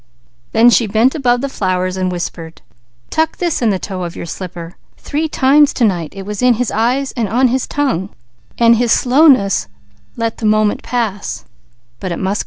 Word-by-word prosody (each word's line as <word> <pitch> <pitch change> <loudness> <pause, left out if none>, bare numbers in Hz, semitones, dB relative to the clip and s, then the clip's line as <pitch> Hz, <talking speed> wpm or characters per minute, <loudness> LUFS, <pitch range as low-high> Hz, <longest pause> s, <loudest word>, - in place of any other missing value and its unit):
Then 235 +2 +5
she 230 -1 +3
bent 225 +5 +2
above 245 -5 +1
the 275 - -1
flowers 185 -6 -2
and 185 -1 -1
whispered: 170 -2 -6 0.5
"Tuck 320 0 0
this 345 -6 -1
in 235 - +2
the 195 - +1
toe 185 0 -6
of 170 -1 -6
your - - -6
slipper! 170 -1 -8 0.2
Three 310 +2 -2
times 285 +1 +3
to 240 - +2
night 175 -7 -1
it 195 - -7
was 210 +2 -5
in 250 -1 +4
his 245 0 -2
eyes, 250 +5 0
and 230 -5 -3
on 250 +4 +2
his 255 +1 -1
tongue, 255 -10 -1 0.5
but 230 0 +5
his 240 0 +1
slowness 250 - +3 0.5
let 230 -1 -2
the 220 - -1
moment 215 0 +2
pass. 225 -5 -3
225 Hz, 175 wpm, -16 LUFS, 190-255 Hz, 0.5 s, Then